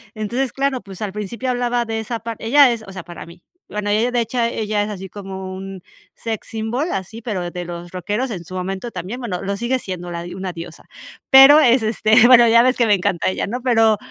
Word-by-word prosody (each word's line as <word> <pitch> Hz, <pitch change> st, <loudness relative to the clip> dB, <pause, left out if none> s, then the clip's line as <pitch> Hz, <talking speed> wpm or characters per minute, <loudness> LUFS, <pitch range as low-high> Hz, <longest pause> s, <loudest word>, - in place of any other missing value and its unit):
Entonces, 240 Hz, +5 st, -2 dB
claro, 275 Hz, -3 st, -1 dB
pues, 195 Hz, 0 st, -12 dB
al 205 Hz, -2 st, -3 dB
principio 230 Hz, +5 st, -4 dB
hablaba 245 Hz, -1 st, 0 dB
de 225 Hz, 0 st, -3 dB
esa 225 Hz, +1 st, -4 dB
parte 225 Hz, -1 st, -7 dB
ella 275 Hz, +1 st, +6 dB
es, 225 Hz, -2 st, -4 dB
o -, -, -9 dB
sea, 185 Hz, -3 st, -8 dB
para 175 Hz, -2 st, -10 dB
mí, 170 Hz, +1 st, -15 dB, 0.3 s
bueno, 210 Hz, 0 st, -3 dB
ella, 225 Hz, +4 st, +1 dB
de 240 Hz, -1 st, +1 dB
hecho, 235 Hz, +2 st, -3 dB
ella 215 Hz, -3 st, -1 dB
es 210 Hz, -, -4 dB
así 190 Hz, -2 st, -7 dB
como 190 Hz, -2 st, -7 dB
un 190 Hz, -1 st, -8 dB, 0.3 s
sex 225 Hz, -2 st, -5 dB
symbol, 225 Hz, +7 st, -3 dB
así, 195 Hz, +5 st, -5 dB
pero 185 Hz, -6 st, -4 dB
de 175 Hz, -1 st, -6 dB
los 175 Hz, 0 st, -8 dB
rockeros 210 Hz, +7 st, -3 dB
en 175 Hz, -4 st, -6 dB
su 185 Hz, -, -9 dB
momento 190 Hz, +5 st, -4 dB
también, 220 Hz, +7 st, -6 dB
bueno, 210 Hz, -8 st, -4 dB
lo 200 Hz, +1 st, -2 dB
sigue 240 Hz, +4 st, 0 dB
siendo 180 Hz, -4 st, -6 dB
la 170 Hz, 0 st, -5 dB
dio 175 Hz, -, -8 dB
una 185 Hz, -2 st, -5 dB
diosa. 165 Hz, -1 st, -10 dB, 0.4 s
Pero 270 Hz, +3 st, +9 dB
es 245 Hz, -4 st, +4 dB
este, 220 Hz, +1 st, +4 dB
bueno, 240 Hz, -2 st, +7 dB
ya 230 Hz, +1 st, +6 dB
ves 255 Hz, +1 st, +3 dB
que 235 Hz, -2 st, +2 dB
me 210 Hz, -, +4 dB
encanta 180 Hz, -1 st, -1 dB
ella, 185 Hz, -, -3 dB
¿no? 245 Hz, +5 st, -4 dB
Pero 225 Hz, -4 st, +3 dB
215 Hz, 235 wpm, -20 LUFS, 190-240 Hz, 0.4 s, Pero